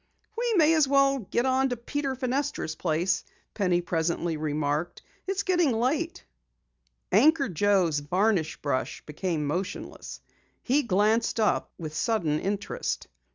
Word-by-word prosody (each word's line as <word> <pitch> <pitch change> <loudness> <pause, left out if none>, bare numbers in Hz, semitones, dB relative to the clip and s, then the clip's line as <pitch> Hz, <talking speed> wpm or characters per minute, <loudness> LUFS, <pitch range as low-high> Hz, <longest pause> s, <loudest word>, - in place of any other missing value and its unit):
"We 475 0 0
may 325 -3 +5
as 310 -4 +4
well 275 0 +3
go 230 +1 -1
on 265 +1 +2
to 245 - -2
Peter 270 +3 -3
Fenestra's 260 - -2
place," 175 +4 0 0.3
Penny 180 -4 +1
presently 170 -1 -1
remarked. 150 +1 -2 0.2
"It's 390 +1 -1
getting 350 -8 +2
late." 275 +9 -1 0.9
Anchor 280 - +5
Joe's 185 -4 +2
varnish 180 +2 0
brush 140 -3 -2
became 155 0 -2
motionless. 180 +7 -4 0.4
He 275 +4 +2
glanced 220 +1 +1
up 215 - +1
with 155 -3 -6
sudden 160 -4 0
interest. 195 - -3
205 Hz, 125 wpm, -27 LUFS, 165-270 Hz, 0.9 s, may